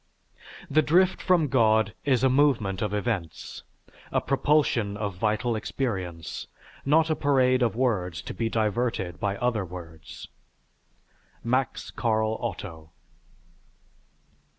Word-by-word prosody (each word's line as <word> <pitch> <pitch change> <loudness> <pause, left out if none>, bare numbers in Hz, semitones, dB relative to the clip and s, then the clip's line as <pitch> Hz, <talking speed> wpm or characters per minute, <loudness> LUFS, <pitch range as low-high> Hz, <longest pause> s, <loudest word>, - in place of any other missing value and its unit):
_The 155 +2 +4
drift 180 +5 +3
from 175 -5 +3
God 110 -5 +3
is 130 -3 +2
a - - +6
movement 130 -8 +2
of 105 - -1
events, 105 -6 -3 0.5
a - - +2
propulsion 135 -7 +1
of 105 -2 -3
vital 110 +5 0
experience, 95 -8 -4 0.4
not 160 +3 +3
a - - +2
parade 130 -3 +3
of 115 -2 +1
words 95 -10 -1
to - - -6
be 115 -1 -2
diverted 110 -5 -1
by 100 -1 -1
other 120 -3 0
words_. 85 -3 -10 1.2
MAX 125 +1 -1
CARL 110 -1 0
OTTO. 90 -8 -6
115 Hz, 115 wpm, -26 LUFS, 100-130 Hz, 1.2 s, a